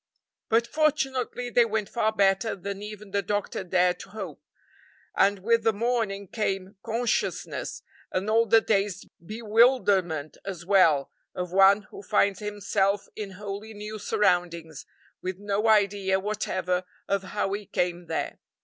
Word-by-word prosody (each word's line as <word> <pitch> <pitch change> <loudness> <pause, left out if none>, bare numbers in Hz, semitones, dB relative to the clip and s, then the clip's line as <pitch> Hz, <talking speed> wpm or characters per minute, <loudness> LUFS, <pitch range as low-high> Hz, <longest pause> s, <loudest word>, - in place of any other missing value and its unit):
But 230 +1 +3
fortunately 265 -4 0
they 240 - +5
went 220 -2 -1
far 220 -2 0
better 200 +1 +2
than 200 +1 -6
even 210 -1 -9
the 200 0 +1
doctor 205 -1 -2
dared 180 0 +2
to 195 - -10
hope, 215 +3 -7 0.7
and 200 +1 +4
with 230 +4 +2
the 225 - +4
morning 215 -3 -1
came 195 -1 -2
consciousness, 230 +1 -2 0.3
and 185 +2 -1
all 225 +1 +3
the 225 +2 +6
dazed 200 -3 0 0.2
bewilderment 210 - +2
as 180 -4 -6
well, 165 -8 +4 0.2
of 180 -1 -4
one 195 +2 +6
who - - -9
finds 200 -1 +2
himself 205 -1 0
in 205 -3 -6
wholly 205 +2 -7
new 210 +1 -6
surroundings, 175 -6 0 0.3
with 185 0 -4
no 205 +2 -1
idea 200 -3 +3
whatever 185 -3 -1 0.2
of 200 0 +1
how 195 +1 -2
he 205 -1 -4
came 175 -1 -1
there. - - -3
200 Hz, 140 wpm, -27 LUFS, 190-220 Hz, 0.7 s, the